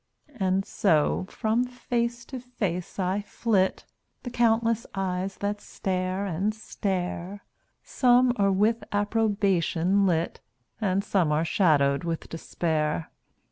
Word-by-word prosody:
And 190 0 +1
so 175 0 +1
from 225 +3 0
face 240 -1 -2
to 260 - -7
face 200 -8 -4
I 190 +1 0
flit, 205 -2 0 0.4
The 245 - -5
countless 230 -1 +2
eyes 190 0 -2
that 205 0 -2
stare 185 +1 -2
and 195 +4 -1
stare; 190 -2 -3 0.4
Some 250 -1 +4
are 200 -1 +3
with 210 +3 +2
approbation 200 -3 +1
lit, 165 -1 0 0.4
And 195 -1 +1
some 185 -6 +1
are 155 +2 +1
shadowed 145 -6 +3
with 165 -1 -4
despair. 160 -1 -2
195 Hz, 115 wpm, -26 LUFS, 180-220 Hz, 0.4 s, Some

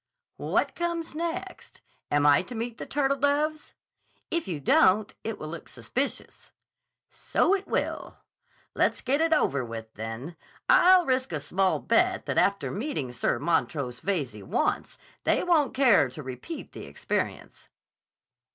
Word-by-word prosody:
"What - - 0
comes 340 -1 -3
next? 335 +2 -5 0.3
Am 145 0 +2
I 145 -1 +6
to 240 +6 -9
meet 230 +1 -4
the - - -6
turtledoves?" 285 +2 0 0.6
"If 335 -1 -1
you 170 -5 -3
don't, 190 +8 +4
it 225 -1 -4
will 155 - -7
look 165 0 -8
suspicious." 275 +3 -4 0.6
"So 385 - +1
it 400 -1 -1
will. - - -2 0.6
Let's - - +1
get 280 +4 +1
it 325 0 +2
over 140 - +2
with, 115 -1 -8
then. 115 +9 -7 0.3
I'll 370 -7 +6
risk 260 -3 0
a 155 - -2
small 185 +6 +1
bet - - +2
that - - +1
after 200 0 +1
meeting 200 - -3
Sir 120 - 0
Montrose 140 -4 -1
Veyze 140 - -2
once, - - -1 0.3
they - - +2
won't 310 -7 +2
care 240 - +5
to 135 +4 -9
repeat 130 - -7
the - - -9
experience." - - -4
215 Hz, 140 wpm, -27 LUFS, -, 0.6 s, I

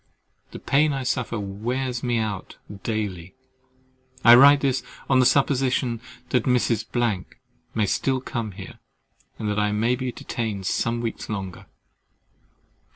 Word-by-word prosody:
The - - -7
pain 145 +2 +2
I 135 -1 -3
suffer 125 -3 -1
wears 120 +5 -3
me 120 -2 0
out 110 -4 -4 0.2
daily. 100 -5 -4 0.9
I 120 - +9
write 140 +3 +8
this 135 -2 +1 0.3
on 130 -1 +4
the 125 - +6
supposition 130 -4 +1 0.3
that 125 -2 +1
Mrs. 120 -3 +1 0.6
—— - - -39
may 110 -2 +2
still 130 +6 0
come 115 -5 -4
here, 95 0 -10 0.6
and 110 - -4
that 105 0 0
I 105 0 +1
may 115 +4 +1
be 130 0 -3
detained 110 -5 -4
some 115 +4 0
weeks 115 -1 -4
longer. 95 -4 -5
120 Hz, 140 wpm, -24 LUFS, 105-130 Hz, 0.9 s, I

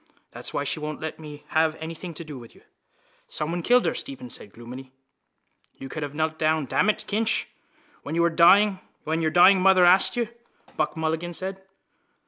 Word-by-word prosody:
That's - - -6
why 145 - -2
she 145 +3 -2
won't 150 0 -5
let 160 0 -6
me 150 -2 -10
have 160 0 +2
anything 165 +2 -7
to 170 - -6
do 150 -4 -9
with 115 -1 -14
you. - - -20 0.6
—Someone 165 +3 -3
killed 245 +7 +3
her, - - +1
Stephen 255 -2 -6
said 100 - -4
gloomily. 125 +4 -10 0.9
—You 135 - -9
could 155 - -6
have 145 0 -5
knelt 155 0 -2
down, 155 -1 +1
damn 195 +10 +1
it, 215 - -1
Kinch, 220 +2 0 0.6
when 150 - -5
your 170 0 +3
dying 190 +4 +5 0.3
mother 180 +4 +5
asked 185 +6 +4
you, 235 -2 0 0.5
Buck 155 +1 -1
Mulligan 160 +2 -2
said. 190 +2 -4
160 Hz, 170 wpm, -25 LUFS, 150-185 Hz, 0.9 s, dying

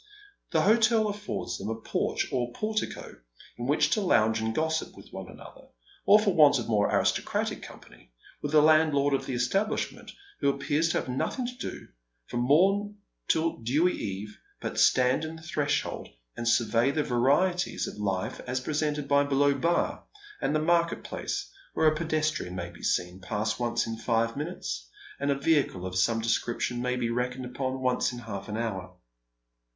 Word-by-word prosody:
The 160 -2 +2
hotel 220 +1 +4
affords 205 0 -4
them 100 - -4
a 110 - -1
porch, - - -1
or 120 -2 -1
portico, 215 - -3 0.4
in 120 +1 -5
which 150 +1 +2
to 215 - +2
lounge 110 - +3
and 110 0 -2
gossip 160 0 -1
with - - -13
one - - -7
another, - - -13 0.4
or 205 +2 +8
for 210 -3 +1
want 150 -4 +6
of 120 - -4
more 105 -2 +2
aristocratic - - 0
com - - -11
pany, - - -18 0.3
with 145 - -3
the 155 -1 +6
landlord 155 -2 +4
of 135 - -1
the 130 - -2
establishment, 195 - -1 0.3
who 140 - +2
appears 145 +4 0
to - - +1
have - - -3
nothing 135 - -2
to 250 +1 -5
do, - - -7 0.4
from 120 0 -2
mom 195 +7 +3 0.3
till 160 +1 +1
dewy 145 +10 +2
eve, 105 +1 -5 0.2
but - - -3
stand 125 +3 +4
on 160 +1 -5
his 160 +1 -10
threshold 145 -1 -1 0.3
and 120 - -4
survey 115 +1 +3
the 150 +2 0
varieties 145 +9 +1
of - - -7
hfe 95 -3 -2
as 130 +1 -1
presented 150 +1 -1
by 140 0 +4
Below 140 0 +3
Bar 170 +4 0 0.4
and 150 - 0
the - - +3
market 170 +1 +1
place, - - -4 0.3
where - - +2
a 155 - +6
pedestrian 155 - -1
maybe 85 -1 -7
seen 90 +1 -1
to 95 - -14
pass 105 +1 -1
once 120 -1 0
in 115 0 -4
five 115 0 0
minutes, - - -5 0.3
and 140 - -1
a 140 - +3
vehicle 140 - +1
of 95 0 -5
some 115 +5 +2
description 120 +1 -1
may 125 0 0
be 120 -2 -1
reckoned 125 +1 -2
upon 130 +1 -3
once 125 -1 +1
in 125 - -7
half 110 -4 -7
an 105 - -3
hour. 110 -5 -4
135 Hz, 180 wpm, -28 LUFS, 115-160 Hz, 0.4 s, or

